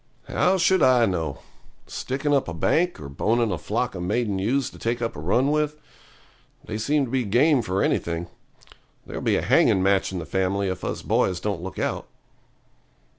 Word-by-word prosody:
'How 190 +1 +2
should 185 0 +3
I 125 -3 +5
know? 80 -8 -2 0.4
Sticking 140 +3 -2
up 140 - +2
a 85 - -5
bank, 175 - +1
or 70 - -7
boning 110 - 0
a 90 - -2
flock 110 +10 -2
of 90 - -6
maiden 100 +2 -1
ewes 125 +7 0
to - - -14
take 120 +1 -1
up 115 -1 -3
a - - -7
run 120 - +1
with? 150 0 0 0.9
They 110 - -4
seem 145 +5 +1
to 120 - -9
be 130 -1 +1
game 125 +6 +3
for 95 -4 -1
anything. 85 0 -1 0.8
There'll - - -6
be - - +2
a - - -2
hanging 95 - +4
match 95 0 +2
in 95 - -4
the 85 - -5
family 95 +2 0
if 95 - -5
us - - -4
boys 90 -2 +1
don't 100 -5 -3
look 95 +2 -7
out.' - - -2
110 Hz, 190 wpm, -24 LUFS, 95-135 Hz, 0.9 s, I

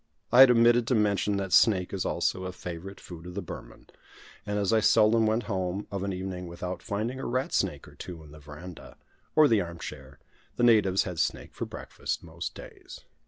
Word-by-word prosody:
I 125 - +5
had 135 -1 +11
omitted 120 0 +5
to 130 - +2
mention 105 -1 +1
that 95 -2 -3
snake 95 -5 +4
is 95 - -2
also 95 - -1
a 90 - -4
favourite 90 +2 -8
food 85 -1 -10
of 90 - -9
the 100 - -2
Burman; - - -10 0.6
and 105 0 -1
as 100 +1 +1
I 110 - +5
seldom 110 +1 +4
went 110 +2 +1
home 95 -1 -3
of 100 -2 -3
an 100 0 -2
evening 90 -1 -5
without 90 +1 -6
finding 115 +5 -3
a - - -5
rat 130 +2 -1
snake - - -1
or - - -14
two 85 -3 -9
in 75 - -15
the 75 - -13
verandah, 75 +5 -11 0.4
or 155 -1 +7
the 110 -6 +3
arm 85 -1 -6
chair, 70 -4 -9 0.4
the - - -1
natives 105 -5 +4
had 90 -3 -5
snake - - -2
for - - -4
breakfast, - - -5
most - - -6
days. - - -11
100 Hz, 210 wpm, -28 LUFS, 90-110 Hz, 0.6 s, had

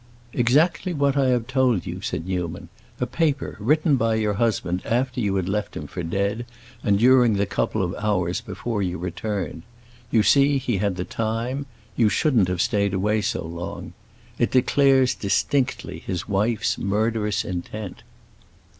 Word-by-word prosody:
"Exactly 155 +8 +2
what 140 -1 +2
I 135 -2 +3
have 125 -2 +1
told 130 - +1
you," - - -5
said 80 - -3
Newman. 90 -2 -4 0.3
"A 125 - +1
paper 145 +2 -1
written 150 - +3
by 115 -1 +1
your 105 -1 +1
husband 100 -5 0
after 125 +2 0
you 100 -3 0
had 95 -2 -1
left 105 +2 -2
him - - -5
for - - -6
dead, 100 +7 -1 0.4
and 100 -1 +3
during 125 0 +5
the 100 0 +1
couple 100 +1 -1
of 90 0 -2
hours 95 -5 0
before 115 -4 -4
you 90 -1 -2
returned. 90 -1 -4 0.5
You 110 -3 +3
see 140 +3 +4
he 125 -5 -1
had 100 -2 0
the 90 0 -3
time; 115 +5 -2 0.3
you 115 -3 +4
shouldn't 115 - +2
have 90 -1 -1
stayed 100 -2 +1
away 105 +3 +1
so 100 -5 -2
long. 85 +1 -6 0.5
It - - +2
declares 130 0 +4
distinctly 125 +6 -1
his 90 -3 -4
wife's 105 +2 0
murderous 105 +1 0
intent." 95 +2 -6
110 Hz, 160 wpm, -23 LUFS, 95-125 Hz, 0.5 s, during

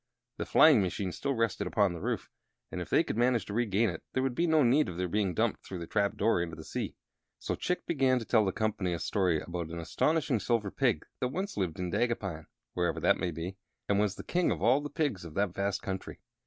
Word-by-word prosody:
The - - -4
flying 150 -9 +7
machine 95 0 -2
still 140 +8 -2
rested 115 -4 0
upon 100 -1 +2
the 85 - -7
roof, - - -3 0.4
and - - -4
if - - -6
they - - +4
could - - -4
manage 120 -1 +2
to 100 - -6
regain 110 -1 +2
it 85 -4 -4
there 130 - +1
would 135 -2 0
be 170 +7 +1
no 160 -2 +4
need 135 +5 +4
of 85 - -7
their 90 0 -1
being 95 0 0
dumped 115 0 0
through 95 - -7
the 85 - -5
trap 100 +2 0
door 115 -6 +2
into 85 -1 -4
the 80 - -9
sea. - - -4 0.4
So - - -3
Chick 180 - -2
began 135 -5 +2
to 115 - -4
tell 110 -1 +4
the 95 - +1
company 100 -3 -1
a 85 - -3
story 90 -3 +1
about 85 -2 -5
an 85 - -6
astonishing 140 - +1
Silver 105 -3 0
Pig - - +1
that 125 - +1
once 190 +10 -4
lived 90 -5 -2
in 90 -1 -3
Dagupan 95 -8 -1 0.3
(wherever 85 -2 0
that - - +3
may 90 - 0
be), 85 +4 -5 0.3
and 100 0 +2
was 105 -2 +1
the - - -8
king 180 0 +1
of - - -1
all 130 +5 +4
the 145 - -5
pigs 145 - -1
of 85 -2 -10
that 100 -3 +1
vast 100 0 -1
country. 95 -2 -5
100 Hz, 245 wpm, -30 LUFS, 90-125 Hz, 0.4 s, flying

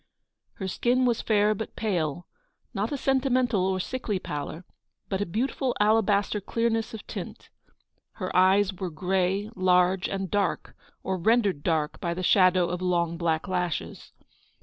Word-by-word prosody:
Her 190 - -5
skin 245 +6 +1
was 240 -2 +1
fair 210 -1 +3
but 215 +1 -6
pale, 175 -7 -2 0.2
— - - -47
not 210 +1 -2
a 285 - -1
sentimental 255 -7 +1
or 190 -1 0
sickly 215 0 -2
pallor, 155 +1 -6 0.4
but 195 0 -1
a 205 - -1
beautiful 250 +6 -1
alabaster 210 -1 +2
clear 230 +4 0
ness 225 0 -2
of 215 - -10
tint. - - -8 0.6
Her 185 -3 -5
eyes 190 +2 +4
were 185 0 -4
grey, 190 +5 -1
large, 185 0 +2
and 195 -2 -3
dark, 200 -3 -1 0.3
or 190 -1 -2
rendered 205 -5 +2
dark 155 -2 -1
by 170 -1 -2
the 185 - -4
shadow 185 -1 +4
of 180 0 -3
long 170 -2 0
black 165 -1 -1
lashes. 180 -3 -3
190 Hz, 155 wpm, -26 LUFS, 180-220 Hz, 0.6 s, eyes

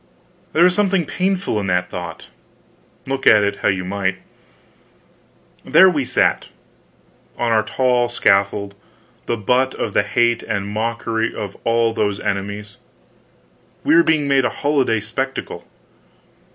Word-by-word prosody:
There 165 - +4
was 180 0 +5
something 195 -3 +1
painful 185 - -1
in 100 - -3
that 90 -1 -1
thought, 85 -2 -7 0.8
look 135 0 -3
at 105 -1 +7
it 100 0 -1
how - - -1
you 95 -1 0
might. 95 -1 -2 1.5
There 190 0 +6
we 145 -6 -1
sat, - - +1 0.9
on 120 -1 0
our 110 -1 +4
tall 125 +2 0
scaffold, 100 -3 +1 0.5
the 120 - -1
butt 125 +5 +1
of 105 - -3
the - - +3
hate 120 +3 +1
and 100 -2 -3
mockery 115 +1 -2
of 100 -2 -6
all 115 0 +2
those 105 -3 -1
enemies. 100 +1 -4 1.1
We 155 - +3
were 170 - +7
being 155 -3 +1
made 135 -1 +3
a 125 - +1
holiday 135 -7 0
spectacle. 130 +5 -5
115 Hz, 140 wpm, -19 LUFS, 100-135 Hz, 1.5 s, at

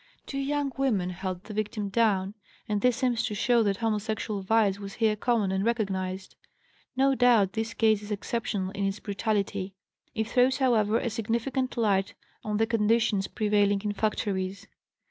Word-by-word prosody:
Two 275 - -4
young 285 0 -1
women 210 -10 +1
held 185 0 -5
the 215 - -9
victim 210 0 -2
down, 200 -2 +1 0.3
and 210 -2 -1
this 250 0 +3
seems 240 -2 +1
to 230 -4 -2
show 240 +3 +3
that 200 -3 +1
homosexual 215 -1 -2
vice 200 0 +2
was 200 -1 -7
here 220 -2 +2
common 215 -3 +1
and 190 0 0
recognized. 190 -5 -2 0.6
No 270 +1 +4
doubt, 240 -7 +4
this 225 0 -3
case 220 -2 +3
is 205 - -9
exceptional 205 -2 -2
in 200 0 -4
its 195 +2 -3
brutality. 200 -2 -2 0.4
It 220 -1 -1
throws, 255 +2 +3
however, 225 -5 +2
a 240 - -2
significant 235 +4 -2
light 205 -2 +1 0.3
on 210 -1 -1
the 225 - +3
conditions 220 -3 +1
prevailing 205 -1 +1
in 210 -1 -1
factories. 200 -2 -2
215 Hz, 165 wpm, -27 LUFS, 200-230 Hz, 0.6 s, No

